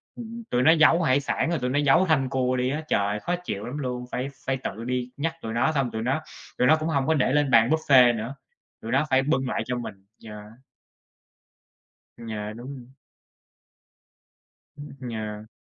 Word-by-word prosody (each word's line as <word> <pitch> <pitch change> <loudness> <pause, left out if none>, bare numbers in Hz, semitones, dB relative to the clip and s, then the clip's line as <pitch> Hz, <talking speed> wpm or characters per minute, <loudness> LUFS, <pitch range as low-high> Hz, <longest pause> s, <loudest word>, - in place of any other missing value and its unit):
ừm, 235 0 -8
tụi 125 - +1
nó 160 - +7
giấu 165 +1 +5
hải 135 -3 +3
sản 145 +3 -1
rồi 170 -2 0
tụi 125 0 -2
nó 140 +3 +1
giấu 145 +5 +4
thanh 135 -6 +1
cua 130 -1 0
đi 125 0 0
á. 150 +3 -2
Trời - - +2
ơi! 105 +1 -2
Khó 175 +10 -1
chịu 105 - -4
lắm 130 +4 -5
luôn, 125 -3 -4
phải 130 +2 -3 0.2
phải 135 -1 0
tự 110 - -5
đi 125 0 -3
nhắc 160 +3 -2
tụi 110 - -5
nó, 120 +7 +2
xong 135 -5 -1
tụi 110 - -4
nó 135 +6 0 0.4
tụi 125 - +3
nó 155 - +7
cũng 155 - -2
hông 140 -3 0
có 160 - +3
để 135 -4 +1
lên 145 -1 +2
bàn 115 0 +5
buffet 130 -6 +5
nữa, 115 +5 -5 0.5
tụi - - -6
nó - - +2
phải 130 0 +4
bưng 135 -3 0
lại - - -1
cho 125 0 -2
mình, 100 -5 -8 0.2
yeah. 105 -1 -8 1.8
Dạ, 110 -2 -6
đúng 125 +5 -8
rồi. 125 -2 -11 1.9
Ưm, 140 -3 -9
yeah. 105 -1 -6
130 Hz, 205 wpm, -25 LUFS, 120-150 Hz, 1.9 s, nó